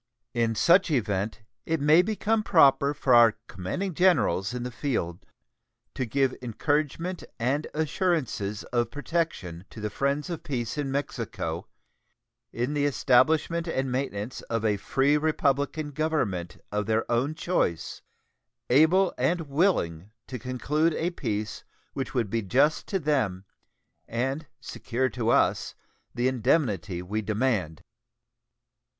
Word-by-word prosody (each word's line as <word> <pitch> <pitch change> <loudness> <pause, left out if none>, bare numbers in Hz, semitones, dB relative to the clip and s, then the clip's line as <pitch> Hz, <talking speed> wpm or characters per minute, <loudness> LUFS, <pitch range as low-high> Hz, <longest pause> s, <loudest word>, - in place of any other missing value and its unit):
In 115 -2 +1
such 180 - +5
event 110 -5 -1 0.2
it 160 0 -1
may 150 +4 +6
become 215 +2 0
proper 140 -8 +5
for 130 -2 +2
our 115 -2 +7
commanding 170 - -4
generals 150 - +2
in 125 -1 -4
the 125 - -4
field 95 - -3 0.7
to 130 - -3
give 135 +2 +1
encouragement 150 - -1
and 135 +6 0
assurances 155 - -1
of 120 -2 +1
protection 145 - -3
to - - -11
the 105 0 -3
friends 140 - -1
of 165 - -4
peace 120 -5 -3
in 145 -2 -2
Mexico 140 +1 -3 0.8
in 125 +5 -2
the 145 -1 +1
establishment 155 +5 +2
and 130 -5 -1
maintenance 125 -4 -3
of 115 -1 -1
a 105 -2 +2
free 135 +8 +2
republican 145 0 0
government 135 - -1
of 105 0 -1
their 110 0 +1
own 130 +6 +1
choice, 85 - -1 0.7
able 165 +8 +5
and 165 +7 +1
willing 140 - 0 0.2
to 125 - -6
conclude 150 +7 0
a 175 +2 -1
peace 110 -9 -4 0.3
which 135 0 -4
would 115 -6 0
be 115 - 0
just 135 +10 +2
to 195 - 0
them 130 - 0 0.6
and 135 +6 -2
secure 130 +2 -2
to 120 -3 -2
us - - +2 0.4
the 125 +1 +1
indemnity 105 - 0
we 105 +4 -2
demand. 105 -7 -1
130 Hz, 130 wpm, -27 LUFS, 110-155 Hz, 0.8 s, our